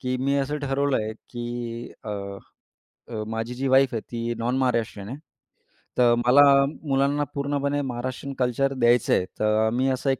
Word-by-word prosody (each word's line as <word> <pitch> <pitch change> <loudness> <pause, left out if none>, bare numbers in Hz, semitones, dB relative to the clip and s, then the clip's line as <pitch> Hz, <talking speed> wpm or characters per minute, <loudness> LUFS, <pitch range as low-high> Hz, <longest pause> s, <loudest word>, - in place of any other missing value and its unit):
की 125 0 -1
मी 140 +1 +1
असं 145 +2 -1
ठरवलं 140 -1 0
आहे, 110 0 -2 0.9
अ, 100 -2 -5 0.7
अ, 110 -2 -4
माझी 115 +2 -3
जी 135 +2 -2
वाईफ 130 0 +4
आहे 115 - -1
ती 120 0 -2
नॉन-महाराष्ट्रीयन 115 -4 -1
आहे, 135 - -6 0.8
तर 120 -1 +5
मला 130 +4 +7 0.5
मुलांना 140 +1 +2
पूर्णपणे 140 0 -1
महाराष्ट्रीयन 130 +1 -4
कल्चर 130 +2 +1
द्यायचं 120 -2 +3
आहे, 90 - +2
तर 110 +1 +2
मी 130 +2 +1
असं 130 +1 -1
एक 135 - +1
130 Hz, 155 wpm, -25 LUFS, 115-135 Hz, 0.9 s, मला